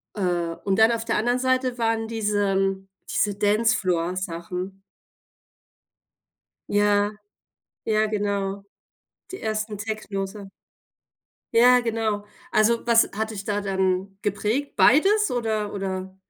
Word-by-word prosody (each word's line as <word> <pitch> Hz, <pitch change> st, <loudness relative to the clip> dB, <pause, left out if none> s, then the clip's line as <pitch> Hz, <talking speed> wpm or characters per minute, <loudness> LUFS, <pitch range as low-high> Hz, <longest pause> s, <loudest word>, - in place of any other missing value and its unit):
Äh, 175 Hz, -4 st, -1 dB
und 195 Hz, 0 st, +1 dB
dann 220 Hz, +1 st, +6 dB
auf 230 Hz, 0 st, -2 dB
der -, -, 0 dB
anderen 245 Hz, +3 st, +1 dB
Seite 255 Hz, -1 st, 0 dB
waren 225 Hz, -1 st, 0 dB
diesem 195 Hz, -3 st, 0 dB, 0.2 s
diese 205 Hz, -1 st, 0 dB
Dancefloor-Sachen. 185 Hz, -3 st, -1 dB, 1.9 s
Ja. 205 Hz, 0 st, +2 dB, 0.7 s
Ja, 215 Hz, 0 st, +2 dB
genau, 200 Hz, -2 st, -2 dB, 0.7 s
die 380 Hz, -, -7 dB
ersten 215 Hz, -1 st, -2 dB
Techno-Sachen. 200 Hz, -2 st, -5 dB, 1.0 s
Ja, 250 Hz, +2 st, +6 dB
genau. 220 Hz, -3 st, -1 dB, 0.3 s
Also, 230 Hz, +2 st, +2 dB
was 230 Hz, -1 st, +5 dB
hat 220 Hz, +1 st, -2 dB
dich 205 Hz, -2 st, -6 dB
da 205 Hz, 0 st, -1 dB
dann 190 Hz, 0 st, -1 dB
geprägt? 210 Hz, +7 st, -1 dB
Beides 405 Hz, -, +4 dB
oder 220 Hz, -4 st, -1 dB
oder? 190 Hz, -1 st, -4 dB
205 Hz, 105 wpm, -24 LUFS, 195-225 Hz, 1.9 s, dann